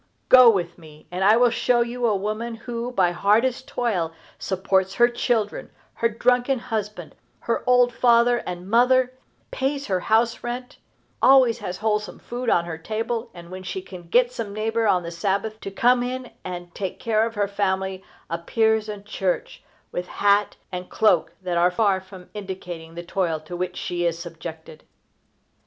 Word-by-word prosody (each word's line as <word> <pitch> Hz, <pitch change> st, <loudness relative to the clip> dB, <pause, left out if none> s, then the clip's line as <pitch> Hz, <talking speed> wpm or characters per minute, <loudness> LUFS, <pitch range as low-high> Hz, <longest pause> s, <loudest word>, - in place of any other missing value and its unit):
Go 255 Hz, -2 st, +9 dB
with 175 Hz, -5 st, 0 dB
me, 155 Hz, -2 st, -15 dB
and 180 Hz, +1 st, -2 dB
I 210 Hz, +3 st, +6 dB
will 245 Hz, 0 st, +4 dB
show 240 Hz, +1 st, +2 dB
you 240 Hz, 0 st, -1 dB
a 215 Hz, -, +2 dB
woman 215 Hz, +4 st, -3 dB
who, 235 Hz, +1 st, -5 dB
by 185 Hz, -7 st, +2 dB
hardest 230 Hz, +8 st, +1 dB
toil, 190 Hz, -12 st, -1 dB, 0.3 s
supports 190 Hz, 0 st, 0 dB
her 240 Hz, -, +6 dB
children, 235 Hz, -3 st, -1 dB, 0.2 s
her 230 Hz, -, +1 dB
drunken 245 Hz, +3 st, +2 dB
husband, 220 Hz, -4 st, -5 dB, 0.3 s
her -, -, -1 dB
old 245 Hz, -1 st, +4 dB
father 240 Hz, 0 st, +4 dB
and 180 Hz, -2 st, -7 dB
mother, 250 Hz, +3 st, +3 dB, 0.4 s
pays 275 Hz, +1 st, -2 dB
her 190 Hz, -3 st, 0 dB
house 230 Hz, +4 st, +1 dB
rent, 250 Hz, +1 st, -5 dB, 0.4 s
always 255 Hz, -3 st, +6 dB
has 185 Hz, -4 st, -5 dB
wholesome 210 Hz, -1 st, -1 dB
food 245 Hz, 0 st, -4 dB
on 170 Hz, -4 st, +3 dB
her 165 Hz, -2 st, -6 dB
table, 225 Hz, +5 st, -3 dB
and, 170 Hz, 0 st, -11 dB
when 185 Hz, 0 st, -7 dB
she 185 Hz, 0 st, -4 dB
can 180 Hz, -2 st, -11 dB
get 245 Hz, +5 st, +4 dB
some 225 Hz, -5 st, -5 dB
neighbor 225 Hz, +1 st, 0 dB
on 180 Hz, -3 st, +3 dB
the 170 Hz, -, -6 dB
Sabbath 200 Hz, +5 st, -2 dB
to -, -, -5 dB
come 245 Hz, +5 st, +3 dB
in 250 Hz, 0 st, -4 dB
and 175 Hz, -1 st, -7 dB
take 190 Hz, -2 st, -4 dB
care 220 Hz, -1 st, +1 dB
of 225 Hz, 0 st, -3 dB
her 205 Hz, -1 st, +1 dB
family, 190 Hz, -1 st, -1 dB, 0.2 s
appears 220 Hz, +6 st, +1 dB
in 205 Hz, -1 st, -6 dB
church, 195 Hz, -3 st, -3 dB, 0.3 s
with 180 Hz, 0 st, -4 dB
hat 205 Hz, 0 st, +2 dB, 0.2 s
and 180 Hz, 0 st, -6 dB
cloak 180 Hz, -7 st, +2 dB
that 175 Hz, -2 st, 0 dB
are 175 Hz, +1 st, +5 dB
far 190 Hz, 0 st, +1 dB
from 185 Hz, -1 st, -13 dB
indicating 180 Hz, -5 st, -7 dB
the 175 Hz, -, -6 dB
toil 170 Hz, -3 st, -1 dB
to 165 Hz, +3 st, -8 dB
which 180 Hz, +1 st, -3 dB
she 175 Hz, -1 st, -1 dB
is 165 Hz, -1 st, -1 dB
subjected. 165 Hz, -2 st, -9 dB
210 Hz, 175 wpm, -23 LUFS, 180-235 Hz, 0.4 s, Go